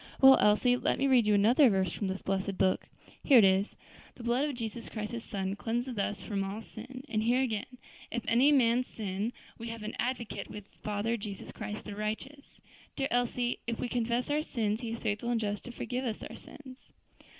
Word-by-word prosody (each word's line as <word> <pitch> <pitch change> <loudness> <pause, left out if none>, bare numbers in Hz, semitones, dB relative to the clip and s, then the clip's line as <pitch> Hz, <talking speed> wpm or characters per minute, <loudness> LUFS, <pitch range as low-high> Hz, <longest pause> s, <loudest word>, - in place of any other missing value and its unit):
"Well, 265 0 +9
Elsie, 210 +4 +4
let - - 0
me 275 - +1
read 255 -5 +4
you 210 - +5
another 240 +7 +6
verse 190 -3 +1
from 200 - -2
this 190 +1 -4
blessed 195 0 -1
book. 190 -1 +2 0.4
Here 275 - +7
it 225 - +8
is: 190 +1 +3 0.4
'The 240 - -10
blood 250 +5 +1
of 280 - -4
Jesus 230 -1 -5
Christ 215 -1 -4
his 235 -1 -5
Son, 195 -2 -3
cleanseth 240 +2 -2
us 200 0 -2
from 200 -2 -2
all 200 +3 -5
sin.' 255 +5 -9
And 215 -5 0
here 240 +4 +3
again: 220 -5 -2 0.4
'If 235 -1 -3
any 250 +6 +5
man 250 -3 +4
sin, 210 -1 -3 0.3
we 230 - -6
have 230 -1 -6
an 215 - -4
advocate 245 -2 -3
with 210 -1 -9
the - - -30
Father 210 +3 -1
Jesus 200 -2 -7
Christ 210 +1 -6
the 210 - -6
righteous.' 220 +7 -5 0.4
Dear 275 0 -1
Elsie, 245 0 0
'if 230 -1 -2
we - - -1
confess 240 +2 -1
our 300 +1 +2
sins, 220 -7 -1
He 235 - -4
is - - -3
faithful 215 +2 -2
and 240 -1 +2
just 205 -1 -3
to 245 - -6
forgive 250 +2 -3
us 225 -3 -3
our - - -10
sins.'" 260 -3 -12
230 Hz, 215 wpm, -31 LUFS, 210-245 Hz, 0.4 s, Well